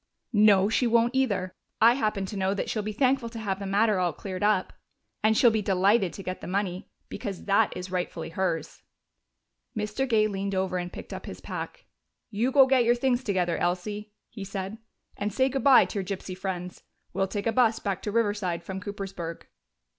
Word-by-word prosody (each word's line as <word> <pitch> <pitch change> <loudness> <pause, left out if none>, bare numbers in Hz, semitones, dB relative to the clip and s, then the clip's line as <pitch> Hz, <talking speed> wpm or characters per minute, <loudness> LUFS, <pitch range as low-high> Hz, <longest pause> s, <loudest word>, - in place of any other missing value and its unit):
"No, 205 -2 +6
she 230 +3 +2
won't 235 +1 +3
either. 200 -9 0 0.3
I 230 +2 +7
happen 215 -6 -1
to 200 - -7
know 190 0 0
that - - -2
she'll 215 - -1
be 215 +1 -4
thankful 255 +1 +1
to 230 - -9
have 200 -3 -2
the 200 - -5
matter 205 0 +2
all 175 -3 +1
cleared 185 +3 -6
up. 205 -2 +2 0.5
And 220 0 +4
she'll 240 - +6
be 220 -1 0
delighted 195 0 +3
to 195 - -8
get 185 0 -5
the - - -7
money, 190 0 -2 0.2
because 200 -6 -6
that 200 -2 +2
is 180 0 -6
rightfully 180 -3 -3
hers." 165 -3 -2 1.0
Mr. 215 +5 -2
Gay 215 -2 +4
leaned 200 -1 -3
over 185 -1 0
and 175 0 -5
picked - - -9
up - - -7
his - - -7
pack. - - -7 0.5
"You 230 +5 0
go 270 -1 +7
get 260 -2 +4
your 240 +1 +4
things 250 0 +1
together, 180 -6 0
Elsie," 205 +4 -2 0.2
he 215 -4 -7
said, 195 +2 -5 0.4
"and 205 +1 -2
say 260 +6 +2
good 270 0 -2
bye 275 -2 +7
to 205 - -4
your - - -2
gypsy 185 0 -5
friends. 180 -1 -5 0.3
We'll 195 - 0
take 200 +1 -4
a 230 - +2
bus 230 -1 +3
back 195 -2 -3
to 210 - -3
Riverside 205 -6 0
from 190 0 -6
Coopersburg." 195 -4 -6
200 Hz, 200 wpm, -27 LUFS, 185-225 Hz, 1.0 s, I